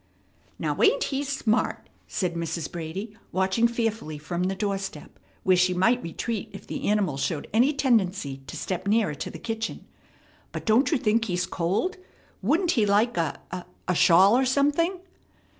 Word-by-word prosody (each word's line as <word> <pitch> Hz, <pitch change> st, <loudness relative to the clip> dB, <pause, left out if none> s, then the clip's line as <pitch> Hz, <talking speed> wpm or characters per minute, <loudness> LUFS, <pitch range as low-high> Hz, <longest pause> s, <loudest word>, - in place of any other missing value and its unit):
"Now, -, -, -2 dB
ain't -, -, +4 dB
he 275 Hz, 0 st, -1 dB
smart?" 270 Hz, -5 st, 0 dB, 0.2 s
said 180 Hz, -3 st, -1 dB
Mrs. 170 Hz, -1 st, -3 dB
Brady, 180 Hz, +6 st, -6 dB, 0.2 s
watching 190 Hz, +5 st, +2 dB
fearfully 225 Hz, -9 st, -2 dB
from 175 Hz, +4 st, -3 dB
the 190 Hz, +1 st, -1 dB
door 200 Hz, 0 st, -1 dB
step, 195 Hz, -6 st, -8 dB, 0.2 s
where 185 Hz, -, +4 dB
she 180 Hz, 0 st, +3 dB
might 235 Hz, +7 st, +3 dB
retreat 205 Hz, +6 st, -4 dB
if 195 Hz, -, -10 dB
the -, -, -4 dB
animal 200 Hz, -9 st, +1 dB
showed 145 Hz, +1 st, -2 dB
any 245 Hz, +6 st, +4 dB
tendency 205 Hz, -, +1 dB
to -, -, -6 dB
step 185 Hz, +1 st, -3 dB
nearer 210 Hz, -6 st, +2 dB
to 145 Hz, -, -5 dB
the -, -, -8 dB
kitchen. 225 Hz, -1 st, -4 dB, 0.7 s
"But -, -, -5 dB
don't 230 Hz, +5 st, +4 dB
you 310 Hz, -, +3 dB
think 225 Hz, -1 st, +1 dB
he's 180 Hz, -3 st, -1 dB
cold? 190 Hz, -, -1 dB, 0.4 s
Wouldn't 325 Hz, -, +2 dB
he 220 Hz, -8 st, +2 dB
like 210 Hz, +4 st, +3 dB
a 165 Hz, -4 st, -1 dB, 0.5 s
a 180 Hz, -, +2 dB
shawl 185 Hz, +5 st, +6 dB
or 260 Hz, -, +3 dB
something?" 295 Hz, +7 st, +1 dB
205 Hz, 165 wpm, -26 LUFS, 180-240 Hz, 0.7 s, shawl